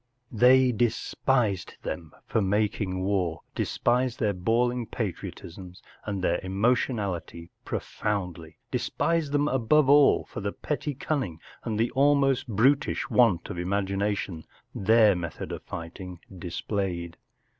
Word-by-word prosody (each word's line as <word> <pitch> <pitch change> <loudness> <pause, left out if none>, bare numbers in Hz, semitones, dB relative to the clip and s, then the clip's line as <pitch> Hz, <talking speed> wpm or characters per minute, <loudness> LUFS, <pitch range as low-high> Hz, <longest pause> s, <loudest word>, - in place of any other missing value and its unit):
They 125 +3 +5
despised 120 -2 0
them 80 -1 -5
for 110 - 0
making 100 -1 0
war; 95 -4 0
despised 125 0 0
their 105 -4 +1
bawling 120 +5 0
patriotisms 90 -3 -6 0.2
and 100 -3 -3
their 85 - +2
emotionality 95 -5 -1
profoundly; 90 -6 -4
despised 165 -4 0
them, 145 0 +2
above 135 +2 +3
all, 145 -1 +5
for - - -7
the 100 0 -3
petty 150 -1 -3
cunning 130 - -2 0.2
and 110 -2 -2
the 115 +1 +1
almost 140 -1 +3
brutish 130 +6 +2
want 115 -9 +3
of 85 - -5
imagination 100 -2 -1 0.3
their 110 0 +4
method 85 -3 -5
of - - -5
fighting 90 +2 -7 0.2
displayed. 90 -1 -3
105 Hz, 115 wpm, -27 LUFS, 90-125 Hz, 0.3 s, They